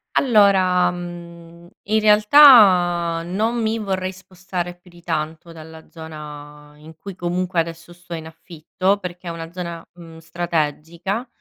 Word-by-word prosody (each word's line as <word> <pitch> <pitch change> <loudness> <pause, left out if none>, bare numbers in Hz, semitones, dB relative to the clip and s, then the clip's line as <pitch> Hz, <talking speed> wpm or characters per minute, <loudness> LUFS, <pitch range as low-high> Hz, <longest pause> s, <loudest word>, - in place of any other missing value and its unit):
Allora, 190 -7 +3
mhmm, 170 -1 -10 0.2
in 220 +1 +1
realtà, 210 - +5
non 220 +7 -1
mi 220 +1 -1
vorrei 190 -3 -3
spostare 185 -1 -7
più 175 0 -22
di 175 0 -17
tanto 160 0 -4
dalla 160 0 -13
zona 150 -2 -11
in 155 +2 -15
cui 195 +4 -10
comunque 180 0 -2
adesso 165 +1 -5
sto 175 0 -12
in 160 -1 -7
affitto, 170 +4 -3
perché 180 -1 -8
è 170 - -3
una 165 0 -8
zona, 170 -2 -7
mhmm, 165 -2 -13
strategica, 170 - -3
175 Hz, 135 wpm, -20 LUFS, 165-185 Hz, 0.2 s, realtà